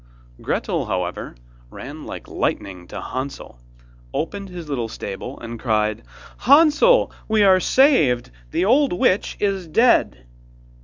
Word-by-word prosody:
Gretel, - - -2
however, 90 -6 -4 0.3
ran - - -9
like - - -8
lightning 90 -3 -3
to - - -7
Hansel, 130 - -6 0.6
opened 195 +4 -4
his 175 -3 -8
little 125 -6 -2
stable, 105 +6 -7
and 115 0 -8
cried: 110 -3 0 0.4
'Hansel, 320 - +5 0.2
we 220 -1 +3
are 190 -2 +6
saved! 160 - +3 0.2
The 180 - 0
old 270 +4 +3
witch 185 +2 +1
is 195 -4 -1
dead! 155 - +2
165 Hz, 120 wpm, -21 LUFS, -, 0.6 s, are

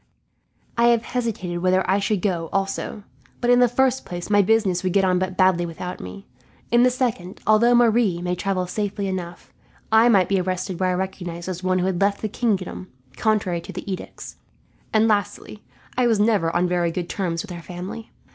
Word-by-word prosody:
I 235 - +5
have 235 -1 +3
hesitated 220 -8 -3
whether 185 +1 +2
I 190 +2 +2
should 200 -2 -1
go, 170 -5 -1
also. 195 +2 -2 0.4
But 240 0 +2
in 245 - +5
the 245 - +6
first 260 +2 +1
place, 175 +3 -6
my 205 0 +6
business 200 -3 +2
would 185 -2 -1
get 195 -1 +3
on 180 -1 +2
but 185 0 -3
badly 185 -2 +3
without 175 +2 -6
me; 195 - -9 0.5
in 240 0 +5
the 250 - +6
second, 235 -8 -2
although 230 +3 +5
Marie 230 -6 +3
might 180 0 -3
travel 190 -2 -1
safely 205 +2 -3
enough, 180 -2 -6 0.4
I 220 +2 +6
might 195 -6 +4
be 195 -2 +1
arrested 185 0 -3
were 185 - +1
I 180 - +1
recognized 180 -2 -5
as 180 -1 -4
one 185 0 +1
who 180 - 0
had 185 -1 -1
left 200 +1 +1
the 215 - -1
kingdom 195 -5 -2 0.3
contrary 195 - 0
to - - -9
the 200 - -6
edicts; 185 - -9 0.5
and 220 0 +3
lastly, 210 0 -2 0.3
I 250 0 +2
never 210 -5 +2
was 165 - -3
on 175 +1 +2
very 175 -1 +1
good 175 0 -4
terms 175 -3 -2
with 205 - -10
her 175 -1 -7
family. 180 +6 -8
190 Hz, 200 wpm, -23 LUFS, 180-220 Hz, 0.5 s, the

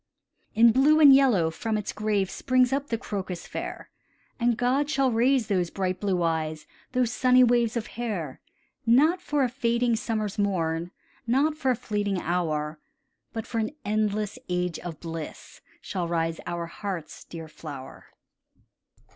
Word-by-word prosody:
In 230 +1 +7
blue 290 +6 +5
and 290 -3 +9
yellow 235 -12 +4
from 220 +6 -2
its 210 - -4
grave 210 -2 0
Springs 255 -1 +2
up 280 +1 -1
the 230 - -1
crocus 190 -6 -5
fair, - - -6 0.5
And 235 -1 +2
God 265 +4 +1
shall 275 -3 +2
raise 245 +2 +3
those 185 -5 0
bright 185 -1 -2
blue 190 -4 0
eyes, 155 -2 -1 0.3
Those 250 -2 +1
sunny 255 0 +5
waves 235 -1 +3
of 225 - -2
hair. 205 - -4 0.5
Not 305 +10 +4
for 295 -5 0
a - - +3
fading 235 -1 +1
summer's 215 -3 -2
morn, 170 -4 0 0.4
Not 280 +6 +2
for 265 -4 -1
a 255 - +3
fleeting 205 -4 -2
hour, 155 -3 -1 0.5
But 225 -1 -5
for 230 - -3
an 220 +6 -2
endless 210 0 -1
age 180 -2 -1
of 170 -3 -7
bliss, 165 -2 -8 0.2
Shall 180 -4 -3
rise 165 -1 -1
our 170 -1 -3
heart's 175 -2 -6
dear 165 -1 -9
flower. 145 -4 -10
215 Hz, 155 wpm, -26 LUFS, 175-245 Hz, 0.5 s, and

